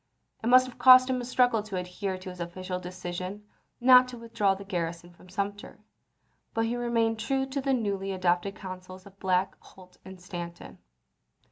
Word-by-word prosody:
It - - -1
must 255 +1 +7
have 255 - -11
cost 255 0 +8
him 255 -1 -1
a - - -5
struggle 245 -3 +2
to 205 -3 -6
adhere 185 +1 -4
to 185 0 -9
his 180 - -12
official 180 +2 -5
decision 180 +2 -6 0.3
not 255 0 +7
to 250 -1 -9
withdraw 230 -4 0
the 195 - -9
garrison 170 -2 -4
from 180 +1 -18
Sumter, 200 +2 -4 0.8
but 225 0 +1
he 230 +2 -1
remained 230 -2 0
true 265 +4 0
to 270 +1 -3
the 270 0 0
newly 200 -6 -1
adopted 185 +1 0
counsels 185 0 -9
of 200 0 -16
Black, 185 0 +1
Holt, 185 -1 -18
and 190 -1 -11
Stanton. 175 -1 -8
195 Hz, 175 wpm, -28 LUFS, 180-235 Hz, 0.8 s, cost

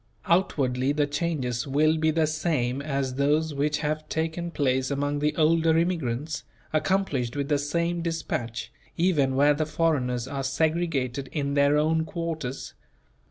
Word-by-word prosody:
Outwardly 135 -7 +1
the 145 0 +2
changes 145 -5 -2
will 155 +3 +3
be 160 0 +1
the 160 0 +2
same 150 -5 -1
as 140 -3 -2
those 150 +4 +1
which 150 +2 0
have 155 +1 -2
taken 160 +2 -2
place 130 -4 0
among 145 +1 -1
the 150 +1 0
older 160 0 +3
immigrants, 160 -4 -1 0.3
accomplished 155 -7 0
with 140 0 -2
the 145 -1 +2
same 170 +4 -1
dispatch, 145 -8 -3 0.3
even 155 -7 +2
where 145 +2 +5
the 155 +1 -1
foreigners 130 -7 0
are 135 0 -3
segregated 140 -2 0
in 140 -2 -2
their 140 +1 +4
own 160 +1 +2
quarters. 160 -7 -4
150 Hz, 145 wpm, -26 LUFS, 135-160 Hz, 0.3 s, where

